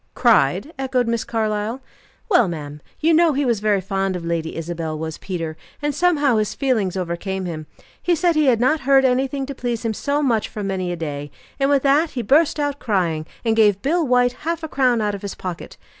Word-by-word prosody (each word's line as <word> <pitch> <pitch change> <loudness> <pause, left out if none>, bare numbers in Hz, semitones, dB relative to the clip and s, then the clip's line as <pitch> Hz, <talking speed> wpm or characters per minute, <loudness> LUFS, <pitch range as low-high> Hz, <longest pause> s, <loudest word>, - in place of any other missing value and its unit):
"Cried?" 315 - +3
echoed 260 -2 0
Miss 230 -1 0
Carlyle. 215 +1 -2 0.5
"Well, 355 - +4
ma'am, 150 -3 -6 0.2
you 325 +2 +3
know 325 -1 +4
he 280 +1 0
was 235 -4 +1
very 205 -2 +1
fond 195 0 -1
of 175 -2 -5
Lady 165 -1 -2
Isabel, 165 -1 -4
was 160 0 -5
Peter, 165 -4 -4 0.2
and 295 0 -1
somehow 290 -8 +2
his 215 -1 -1
feelings 220 -9 0
overcame 185 +2 -3
him. 155 -3 -6 0.3
He 350 - +2
said 345 +1 +2
he 305 -2 +3
had 240 -4 +4
not 305 +6 +2
heard 270 0 +4
anything 265 +2 +1
to 280 - -6
please 240 -3 -3
him 225 - 0
so 285 +6 -1
much 225 -5 +1
for 210 - -6
many 190 -2 -2
a - - -2
day; 145 -3 -5 0.3
and 275 0 +2
with 280 -2 +3
that 290 +4 +3
he 240 - -1
burst 295 +7 +3
out 290 -1 -1
crying, 170 -8 -1 0.2
and 225 -1 +2
gave 205 -3 +3
Bill 335 +5 +2
White 250 -2 +3
half 335 +1 -2
a - - -2
crown 255 -5 +2
out 210 -1 0
of 200 - -6
his 200 -2 -5
pocket. 180 -3 -7
225 Hz, 215 wpm, -21 LUFS, 185-275 Hz, 0.5 s, Well